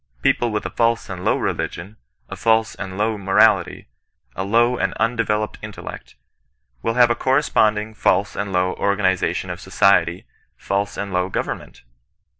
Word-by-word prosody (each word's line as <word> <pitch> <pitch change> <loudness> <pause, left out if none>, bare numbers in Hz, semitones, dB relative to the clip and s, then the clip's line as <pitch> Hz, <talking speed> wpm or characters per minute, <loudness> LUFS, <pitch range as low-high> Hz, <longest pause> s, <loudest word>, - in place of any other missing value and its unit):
People 120 - +2
with 105 -1 -3
a - - -4
false 115 -3 0
and 90 -1 -6
low - - +2
reli - - -1
gion, 95 +5 -10 0.3
a - - -7
false 115 -2 +2
and 95 -1 -7
low 105 0 0
morality, 95 0 +2 0.5
a 95 - -2
low 120 +5 +3
and - - -1
undeveloped 110 -2 -1
intellect, - - -9 0.7
will 115 - -1
have 120 -1 +5
a - - +2
corresponding 110 -5 +1
false 100 -1 +1
and 100 0 -3
low 90 0 0
orga 100 +1 +1
nization 95 -1 0
of 90 - -7
society, 95 -2 +2 0.3
false 100 +1 -2
and 100 -1 -4
low 90 +1 0
government!. - - -5
100 Hz, 160 wpm, -21 LUFS, 95-115 Hz, 0.7 s, have